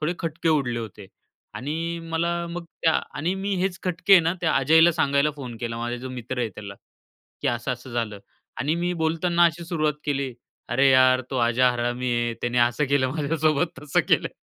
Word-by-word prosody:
थोडे 155 +2 0
खटके 165 0 -2
उडले 135 -7 +1
होते. 105 -3 -8 0.5
आणि 165 +5 -3
मला 170 +1 -1
मग 170 0 -6 0.2
त्या 160 - +4 0.3
आणि 170 +6 0
मी 195 +1 -2
हेच 185 -1 -1
खटके 180 +2 +1
आहे 190 - +9
ना 165 +1 +1
त्या 165 - +1
अजयला 160 +2 +5
सांगायला 140 -2 +2
फोन 125 -5 -7
केला, 115 -1 -3
माझा 120 +1 -3
जो 130 +2 -7
मित्र 125 0 -6
आहे 120 -2 0
त्याला, 100 -1 -9 0.7
की - - +1
असं-असं 125 +1 -3
झालं. 115 -3 -2 0.4
आणि 150 +3 +1
मी 175 +1 -1
बोलताना 170 +2 +2
अशी 170 0 +1
सुरुवात 155 -3 0
केली. 140 -3 -1 0.4
"अरे 130 +3 +3
यार, 130 0 +5
तो 135 - -2
आजा 125 +1 +3
हरामी 120 +1 -2
आहे. 120 0 -1
त्याने 120 0 -1
असं 120 +4 +2
केलं 135 -2 +2
माझ्यासोबत 155 +1 0
तसं 150 - +2
केलं." - - +3
140 Hz, 185 wpm, -24 LUFS, 120-165 Hz, 0.7 s, आहे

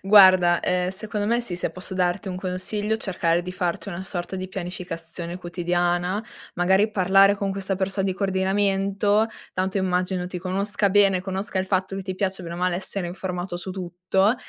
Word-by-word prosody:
Guarda, 185 -3 +7
ehm, 180 0 +1
secondo 205 +2 -3
me 235 +2 +2
sì, 235 -7 -3
se 175 - -2
posso 185 +1 -5
darti 180 +1 0
un 180 - -4
consiglio, 195 +4 -1
cercare 175 -5 +1
di 180 +1 -6
farti 180 +2 -2
una 185 -1 -5
sorta 180 -1 -4
di 185 0 -5
pianificazione 175 -2 -6
quotidiana, 175 +3 0 0.3
magari 190 +4 +3
parlare 195 0 +5
con 200 -1 -1
questa 195 0 -2
perso 195 +1 -1
di 190 -1 0
coordinamento. 195 +2 +1 0.3
Tanto 190 +2 -1
immagino 180 -1 0
ti 180 0 -5
conosca 200 +3 0
bene, 195 -2 +4
conosca 190 +1 -3
il 185 - 0
fatto 190 0 0
che 195 - -4
ti 190 0 -4
piaccia 190 -1 -1
bene 170 -1 -6
o - - -6
male 180 0 +1
essere 190 0 -2
informato 180 0 -4
su 180 +2 -6
tutto 185 +3 +1
190 Hz, 180 wpm, -24 LUFS, 180-195 Hz, 0.3 s, Guarda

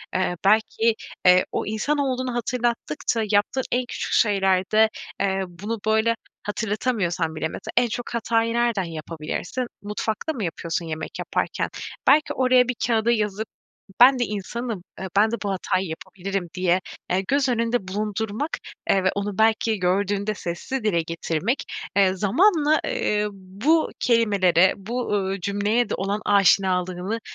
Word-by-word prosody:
Eee, 185 -1 +1
belki, 220 +2 +3 0.3
eee, 180 0 +6
o - - -2
insan 220 +8 -1
olduğunu 255 -2 -1
hatırlattıkça 235 -3 -1
yaptığın 210 +6 +2
en 250 0 +1
küçük - - -4
şeylerde, 200 +1 +3 0.3
eee, 195 -1 +1
bunu 205 +6 -5
böyle 220 +1 +3 0.3
hatırlatamıyorsan 205 -6 -1
bile 160 - -1
mesela - - -7
en 245 -1 +5
çok 240 +2 -5
hatayı 230 0 +1
nereden 235 -5 +1
yapabilirsin? 165 - -4 0.2
Mutfakta 215 +8 -3
mı 225 -7 -4
yapıyorsun 170 0 -3
yemek 160 0 -6
yaparken? - - -2 0.4
Belki 305 0 +5
oraya, 255 -1 +4
bir 250 - -1
kâğıda 230 0 +2
yazıp 210 -1 -1 0.5
"Ben 255 +1 +8
de 245 - +2
insanım, 215 0 -4 0.2
eee, 190 - -4
ben 215 +2 +5
de 235 - -1
bu 200 - -2
hatayı 185 0 -1
yapabilirim." 185 +2 -5
diye, 180 0 +2 0.3
eee, 190 +2 +1
göz 275 -1 +2
önünde 230 -4 0
bulundurmak, 215 +7 -2 0.4
eee, 190 -1 +3
ve 185 - +4
onu 200 -1 -3
belki 220 0 +2
gördüğünde 200 +3 0
sesli 210 +8 -4
dile 170 -6 +2
getirmek, 165 - -2 0.3
eee, 190 -2 +4
zamanla, 305 - +3
ııı, 210 - 0
bu 200 - 0
kelimelere, 200 -6 +4
bu, 230 +6 -4
uuu, 195 -1 -1
cümleye 205 +5 0
de - - -2
olan 200 +2 -2
aşinalığını 190 +1 +2
210 Hz, 145 wpm, -24 LUFS, 185-235 Hz, 0.5 s, Ben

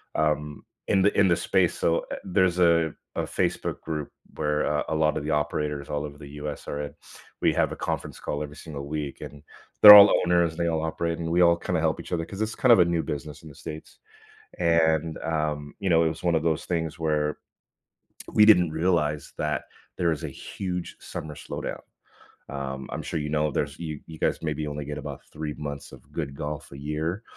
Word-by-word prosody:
um, 75 -1 -1 0.2
in 95 - +3
the 100 - +2
in 100 - +6
the 85 - +4
space - - +1
so, 85 0 +2
eh, - - -3
there's 95 -1 +2
a 85 -2 +4 0.2
a - - +1
Facebook - - -2
group 75 -3 -4 0.3
where, 75 0 0
uh, 75 0 0
a 80 - -1
lot 75 -1 +2
of - - -3
the - - -3
operators 75 -1 -1
all 75 0 -2
over 75 -1 -9
the 75 0 -10
US 75 0 -5
are 75 - -3
in, 70 - -7 0.5
we - - +4
have - - +1
a - - -5
conference - - -4
call 75 - -3
every 75 -1 -6
single 70 -2 -8
week, 75 -2 -4
and 70 0 -9 0.4
they're 105 -1 +14
all 100 0 +10
owners 85 -1 +3
and 80 - -11
they 85 0 +1
all 80 -1 0
operate, 85 +1 -2
and 80 -1 -3
we 85 +2 +3
all 85 -1 +5
kinda 90 -1 -1
help 80 -1 0
each - - -7
other 85 -1 0
'cause 95 - -9
it's 110 0 -2
kind 130 -4 +4
of 115 - +8
a 90 - +6
new 85 -1 0
business 75 +1 -6
in 80 - -10
the 70 - -14
states. 80 +1 -9 0.6
And, 80 -1 +2
um, 75 -2 -2
you 95 - -1
know, 85 -1 +5
it - - +3
was 80 +1 -7
1 85 -1 +2
of 80 - +1
those 80 -2 0
things 80 -2 -2
where 75 -2 0 0.9
we 105 - +6
didn't 90 -6 +6
realize 80 -3 0
that 75 -1 -1 0.3
there 85 -2 +2
is 80 - -3
a - - -4
huge 90 -2 -5
summer 75 -1 -7
slowdown. - - -6 0.7
Um, 65 -1 -5
I'm - - -3
sure - - -3
you 75 - -3
know, 75 0 +1
there's 70 +2 -2
you 80 -4 -5
you 80 -1 -10
guys - - 0
maybe 75 -1 -2
only 75 0 -4
get 75 +1 -5
about 70 - -7
3 75 -1 -5
months 70 -1 -6
of - - -15
good 70 - -4
golf 75 +1 -6
a 70 - -9
year. 80 +7 -3
80 Hz, 220 wpm, -26 LUFS, 75-85 Hz, 0.9 s, they're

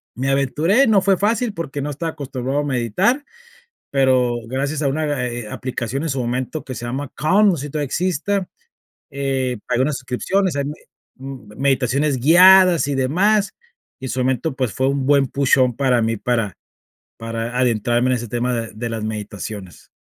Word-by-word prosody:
me 130 +3 -1
aventuré, 155 - +2
no 210 -3 +4
fue 195 0 +3
fácil 220 +3 0
porque 145 -6 -5
no 145 - -3
estaba 165 +3 -3
acostumbrado 135 0 -3
a - - -3
meditar, 130 - +1 0.7
pero 130 -3 +3
gracias 140 +4 -2
a 145 - +1
una, 145 -2 -1
eh 120 0 -5
eh 110 - -9
a - - -8
aplicación 130 +2 -4
en 165 - -2
su 135 -1 -2
momento 125 +5 -3
que 130 - -7
se 120 - -6
llama 130 +3 -4
Calm, 195 +8 +4
no 185 - +2
sé 145 +1 -5
si - - -11
todavía 150 -1 -2
exista, 185 +5 -1 0.6
eh, 135 -3 -2
pagué 125 0 +2
unas 145 +1 0
suscripciones, 155 +8 -1
eh, 140 - 0
me 145 +2 -4 0.4
m 130 -6 -10
meditaciones 135 +1 +1
guiadas 180 +3 +7
y 145 - -1
demás, 195 +11 +2 0.5
y 130 - -5
en - - -4
su 130 - -2
momento, 130 +4 0
pues, 130 -5 -1
fue 130 0 0
un 140 -1 -1
buen 140 -1 +4
Push 140 +1 +2
on 125 -3 +2
para 130 -3 +2
mí, 115 0 0
para 115 -4 -1 0.6
para 115 +1 -4
adentrarme 120 0 +1
en 130 - +2
ese 120 -1 -5
tema 120 +3 -1
de 115 -1 -4
de 120 +2 -4
las 115 -1 -4
meditaciones. 105 -4 -7
135 Hz, 190 wpm, -20 LUFS, 120-150 Hz, 0.7 s, guiadas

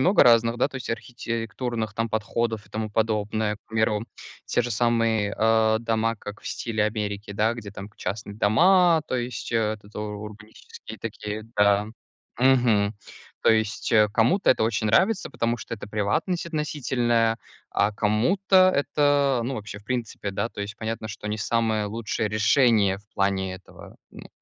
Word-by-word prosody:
много 185 +8 +5
разных, 115 0 +4
да, 125 - +2
то 140 - -8
есть 130 - -7
архитектурных 115 -1 -4
там 115 +2 -2
подходов, 110 0 -2
и - - -24
тому 110 0 -3
подобное. 105 0 0
К - - -30
примеру, 110 -1 0 0.4
те 120 - +1
же 120 - -4
самые, 115 -2 +1
а, 110 0 +3
дома, 115 0 0
как 105 0 -9
в - - -12
стиле 110 -2 -1
Америки, 105 -1 -3
да. 110 +3 +1
Где 110 -4 -8
там 100 0 -8
к 105 - -28
частные 100 +2 -5
дома, 170 - +4
то 130 - -2
есть, 120 -1 -4
этот 110 -2 -2
у - - -3
урбанистические 105 +1 -9
такие, 105 0 -5
да. 100 0 +4 0.5
Мгм. 120 -5 +3 0.5
То - - +5
есть 110 +1 0 0.2
кому-то 175 - +3
это 130 - +2
очень 110 -1 0
нравится, 190 - +2
потому 115 +1 -1
что 115 - -6
это 100 -2 -10
приватность 110 - -1
относительная, 120 -7 0 0.3
а 105 +1 +1
кому-то 185 - +3
это 140 -2 +2
ну, 130 +3 -2
вообще 105 -3 -7
в 105 - -20
принципе, 115 -4 -3
да 100 +4 -2
то 105 - -9
есть 100 0 -7
понятно, 110 -1 -4
что 105 - -8
не 105 - -2
самое 110 -1 0
лучшее 110 +1 -2
решение 110 -2 +3
в 105 - -23
плане 95 -1 0
этого, 95 - -14
ну, - - -12
110 Hz, 165 wpm, -25 LUFS, 105-120 Hz, 0.5 s, много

